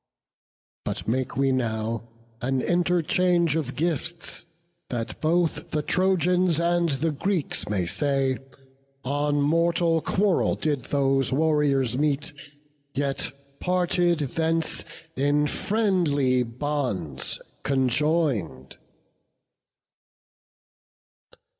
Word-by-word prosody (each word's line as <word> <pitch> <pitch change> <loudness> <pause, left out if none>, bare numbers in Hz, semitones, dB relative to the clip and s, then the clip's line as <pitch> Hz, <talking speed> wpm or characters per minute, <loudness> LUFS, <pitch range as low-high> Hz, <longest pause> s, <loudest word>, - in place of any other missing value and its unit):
But - - -3
make 125 +2 -1
we 135 0 +3
now 115 -2 -2 0.3
an 130 +2 0
interchange 175 -1 +2
of 140 -5 -2
gifts, 170 +2 -2 0.4
That 115 -2 -4
both 165 +1 +1
the 150 -1 -1
Trojans 180 -1 +2
and 170 0 +2
the 150 +3 0
Greeks 170 - -2
may 95 -4 0
say, 135 - 0 0.6
'On 145 +2 0
mortal 165 +2 +2
quarrel 195 +1 +2
did 145 -6 -1
those 135 -2 +2
warriors 140 -4 +2
meet, 150 +1 0 0.6
Yet 140 0 -1 0.3
parted 175 -2 +1
thence 160 +3 0 0.3
in 145 +2 +2
friendly 150 - +1
bonds 115 - -2 0.2
conjoin'd. 130 - 0
150 Hz, 85 wpm, -25 LUFS, 130-170 Hz, 0.6 s, we